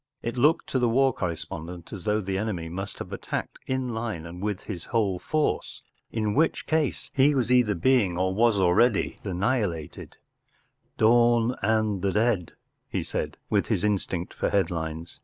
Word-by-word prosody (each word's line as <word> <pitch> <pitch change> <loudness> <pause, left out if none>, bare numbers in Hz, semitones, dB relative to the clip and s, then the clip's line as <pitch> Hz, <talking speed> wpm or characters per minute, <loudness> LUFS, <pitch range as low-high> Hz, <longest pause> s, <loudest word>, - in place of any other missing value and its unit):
It 115 - -3
looked 150 +7 +3
to 130 - +1
the 120 -1 +2
war 135 +2 +3
correspondent 85 -1 -5
as 95 -4 -7
though 105 0 +1
the 95 -1 -3
enemy 95 -5 -2
must 95 +4 -5
have - - -7
attacked - - -4
in 130 -1 -1
line 110 -8 -4
and 85 +2 -8
with 105 -2 -2
his 90 -6 -7
whole 100 -6 0
force—in 110 - -2
which 160 +6 +1
case 160 -3 -1
he 140 +2 +4
was 125 -2 +1
either 125 -5 +4
being 100 -3 +2
or 95 +1 +1
was 115 +1 +3
already 95 +5 +3
annihilated, 95 - -2 0.4
“ - - -43
Dawn 120 +1 +4
and 110 -2 +1
the 100 - +1
Dead,” 105 -4 +1 0.4
he - - -2
said, - - -3
with - - +2
his - - 0
instinct 95 -3 -1
for - - -1
headlines. 80 -3 -2
105 Hz, 165 wpm, -26 LUFS, 90-120 Hz, 0.4 s, he